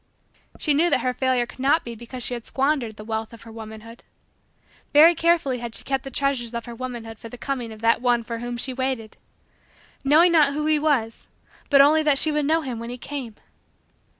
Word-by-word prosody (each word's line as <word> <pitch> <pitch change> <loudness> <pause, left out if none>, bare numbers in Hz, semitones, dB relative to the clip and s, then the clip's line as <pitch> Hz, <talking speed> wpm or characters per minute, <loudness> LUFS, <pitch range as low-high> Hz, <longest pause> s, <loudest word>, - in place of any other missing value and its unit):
She 300 - 0
knew 325 +5 +3
that - - +2
her 255 - 0
failure 255 -1 +1
could 245 - -15
not 280 +5 +3
be 235 - -7
because 235 +2 -8
she - - -3
had 235 -2 -6
squandered 270 -5 0
the 210 - -10
wealth 220 +1 -4
of 230 - -12
her 230 - -12
womanhood. 220 +1 -10 0.9
Very 315 +4 +8
carefully 330 -7 +1
had 235 -1 -6
she - - -7
kept 270 -1 -2
the 270 - -6
treasures 260 -3 -1
of 235 - -4
her 240 - -8
womanhood 235 -2 -7
for 230 - -9
the 245 - -10
coming 250 -3 -4
of 220 0 -11
that 230 +1 +3
one 245 -2 +2
for 230 0 -5
whom 240 0 -5
she 260 +2 -2
waited 255 -4 -3 0.9
knowing 315 +6 +5
not 300 -4 +4
who 300 +1 -2
he 310 -1 +3
was 270 -7 0 0.4
but 275 -1 +7
only 305 +3 +5
that 295 -3 +2
she 310 - +2
would 300 -1 0
know 320 +3 +2
him 255 -6 -5
when 230 +1 -6
he 245 - -6
came. 250 -4 -6
255 Hz, 220 wpm, -23 LUFS, 230-285 Hz, 0.9 s, Very